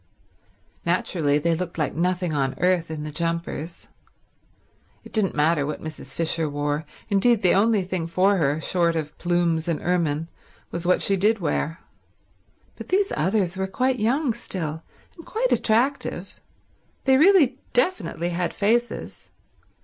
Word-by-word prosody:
Naturally 145 -5 +1
they 165 +3 +1
looked 175 0 -5
like 150 - -1
nothing 180 0 0
on 135 -2 -1
earth 180 -2 +1
in 155 -2 -5
the 150 - -5
jumpers. 165 0 -4 1.2
It - - -14
didn't 210 -5 +1
matter 150 0 +2
what 150 +2 -4
Mrs. 155 -4 -7
Fisher 165 -1 0
wore; 145 +1 -2 0.2
indeed, 215 +2 +3
the 180 - +5
only 210 0 +3
thing 180 -2 -3
for 190 +4 +2
her, 150 -2 +1
short 170 0 +1
of 150 -2 -4
plumes 175 -2 +1
and 165 -3 0
ermine, 165 -3 0 0.4
was 170 +1 -2
what 180 - +3
she 195 - +3
did 210 +4 +3
wear. 165 -2 -2 1.0
But - - -8
these 395 +1 +1
others 185 +1 0
were 190 0 -1
quite 255 +5 0
young 245 +4 +1
still, 165 -9 -4 0.3
and 335 - -12
quite 475 +7 -1
attractive. 245 +6 +1 0.7
They 265 0 +4
really 305 -5 +5
definitely 245 - 0
had 175 0 -2
faces. 235 +4 -1
175 Hz, 145 wpm, -24 LUFS, 160-215 Hz, 1.2 s, the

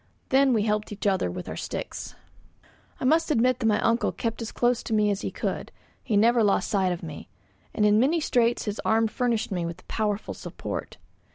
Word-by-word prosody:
Then 270 0 +4
we 220 -4 +2
helped 210 0 -1
each 210 0 -6
other 190 - +2
with 90 +1 -6
our - - -5
sticks. - - -5 0.8
I - - -3
must 320 +5 +3
admit 255 -2 +2
that 230 - +1
my 210 -1 +3
uncle 230 +1 +2
kept 230 0 -3
as 230 - -4
close 245 -1 +1
to 220 - -2
me 210 -1 +3
as 200 - -2
he - - -2
could; - - -4 0.3
he 210 - 0
never 230 +2 +4
lost 205 +1 +2
sight 190 -3 +2
of 175 -1 -4
me, 155 - -8 0.4
and 210 - +1
in 210 +1 +5
many 295 +8 +3
straits 240 -5 +1
his 210 0 -3
arm 225 +1 +3
furnished 230 -1 -1
me 180 -3 -1
with 170 +2 -5
a - - -30
powerful 210 -1 -2
support. - - -6
220 Hz, 210 wpm, -26 LUFS, 205-240 Hz, 0.8 s, in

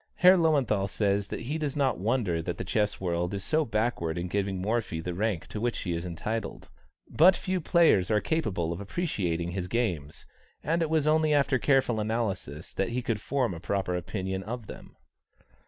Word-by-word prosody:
Herr 180 +1 +7
Löwenthal 135 - +2
says 100 0 0
that - - -5
he 145 +7 -3
does 150 -3 -2
not 135 -7 +1
wonder 100 -5 0
that 85 +1 -4
the - - -3
chess 105 +2 0
world 90 +1 -1
is 100 - -4
so 155 +6 +2
backward 105 - -1
in 90 +1 -3
giving 100 -1 -1
Morphy 105 -3 -1
the 90 +2 -4
rank 100 -2 -1
to 105 - -5
which 120 0 0
he 90 - -2
is 85 +2 -3
entitled; 110 +7 -4 0.4
"but 180 +4 +6
few 185 -1 -2
players 160 - +4
are 105 -1 +3
capable 100 - -1
of 85 - -7
appreciating 95 - -2
his 90 0 -3
games, 90 -10 -2 0.4
and 165 +4 +1
it 160 - 0
was 155 -2 +2
only 155 0 +3
after 140 -2 +2
careful 130 -5 +2
analysis 105 - -3
that 95 - -1
he 125 +1 -2
could 115 -3 -2
form 130 -6 0
a 85 - -7
proper 95 0 -1
opinion 95 +2 -3
of 115 +3 -6
them." - - -11
105 Hz, 190 wpm, -28 LUFS, 90-135 Hz, 0.4 s, Herr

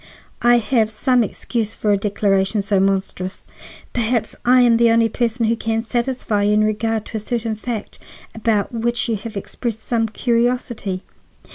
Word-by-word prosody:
"I 240 0 +5
have 230 -1 +1
some 245 +3 +2
excuse 220 +1 -3
for 210 - 0
a - - +5
declaration 200 0 +1
so 200 -1 +1
monstrous. 190 -1 -1 0.5
Perhaps 235 -1 0
I 250 +1 +5
am 235 -2 +5
the 235 0 +4
only 230 0 +4
person 235 0 0
who 225 +1 +2
can 225 0 -1
satisfy 235 -2 -1
you 205 +1 +3
in 210 0 +4
regard 215 +1 0
to 225 - -5
a - - -2
certain 225 0 -2
fact 220 0 -5 0.3
about 220 -2 0
which 235 +1 -1
you 230 - 0
have 220 +1 -7
expressed 220 +2 -5
some 225 -2 +1
curiosity. 235 -4 -1
225 Hz, 165 wpm, -20 LUFS, 210-235 Hz, 0.5 s, I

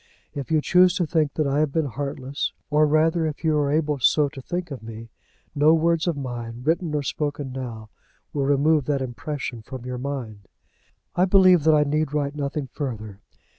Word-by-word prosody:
If 140 -3 -5
you 155 -1 +2
choose 180 +3 +4
to 180 - +1
think 155 -2 0
that 155 - +1
I 140 +1 +1
have 155 -2 +1
been 160 +1 0
heartless, 140 0 -4 0.2
or 150 +1 +4
rather, 160 +2 +2
if 155 +1 -6
you 160 -1 +2
are 145 -1 +1
able 150 -2 0
so 145 +3 +3
to 135 - -10
think 175 +3 -4
of 135 - -6
me, 115 0 -9 0.4
no 150 +3 +5
words 165 +1 +1
of 170 -4 0
mine, 120 -3 -6
written 160 +1 0
or 145 - 0
spoken 145 -1 -3
now, 115 -4 -7 0.4
will 140 -2 0
remove 145 +1 +3
that 140 -2 0
impression 130 -1 -5
from 125 +2 -9
your 125 -1 -4
mind. 125 -7 -6 0.7
I 180 - +4
believe 185 -4 +5
that 160 -1 +6
I 150 - +4
need 150 0 -1
write 145 -1 0
nothing 145 0 -3
further. 110 -8 -5
145 Hz, 195 wpm, -24 LUFS, 130-155 Hz, 0.7 s, that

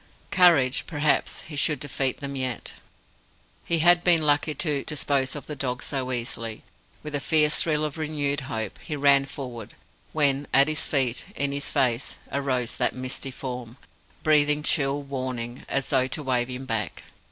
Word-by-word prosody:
Courage 170 -10 +5
perhaps 150 -2 0
he 155 - -9
should 145 0 +1
defeat 135 -1 -2
them 140 0 -4
yet! 130 -2 -4 0.9
He 170 - +1
had 175 0 +6
been 170 -3 +4
lucky 150 +1 +2
to 145 -3 -1
dispose 140 -3 0
of 145 - -7
the 150 - -5
dog 125 -2 -2
so 130 -2 -2
easily. 115 -2 -4 0.4
With 150 -1 -6
a 145 - 0
fierce 150 +1 +3
thrill 155 -2 +1
of 150 +1 -5
renewed 145 -2 -1
hope, 110 -4 -4
he 150 - -5
ran 140 -1 +4
forward; 125 -6 -8 0.4
when 145 -2 +2
at 140 +2 +5
his 155 -1 0
feet, 130 -4 +1
in 140 0 0
his 140 0 -2
face, 130 -3 0
arose 130 -4 -1
that - - +1
misty 130 +1 -3
Form, 125 -2 -7 0.5
breathing 150 -1 +3
chill 145 -2 +2
warning, 130 -3 -5
as 135 -1 -1
though 130 -2 +2
to 145 +4 -3
wave 125 -3 0
him 130 +1 -6
back. 105 - -3
140 Hz, 165 wpm, -25 LUFS, 130-150 Hz, 0.9 s, had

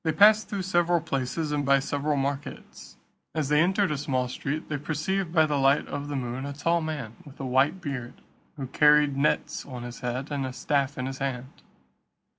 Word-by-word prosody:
They 160 - +1
passed 210 +4 +6
through 200 -3 -3
several 175 -2 +2
places, 150 0 -2
and 145 -1 0
by 140 0 +5
several 145 +2 -1
markets. 140 +1 -5 0.4
As 155 -3 -1
they 150 0 +4
entered 190 +1 +2
a 150 - -2
small 130 -3 0
street, 145 +5 -4
they 145 - -2
perceived 160 +5 -2
by 160 -2 +5
the 150 -2 0
light 135 +1 +3
of 145 0 -5
the 145 - -4
moon, 125 0 -3
a 140 0 -4
tall 165 +4 +1
man, 145 -8 -5
with 145 -4 -15
a 135 - -4
white 135 +8 +2
beard, 130 -6 -5 0.4
who 135 - -4
carried 150 +1 +4
nets 140 +2 0
on 125 -3 -8
his 120 0 -8
head, 125 +4 -4
and 140 -2 -1
a 130 -1 -4
staff 140 0 0
in 125 - -2
his 135 0 -5
hand. 130 -1 -3
145 Hz, 205 wpm, -27 LUFS, 135-155 Hz, 0.4 s, passed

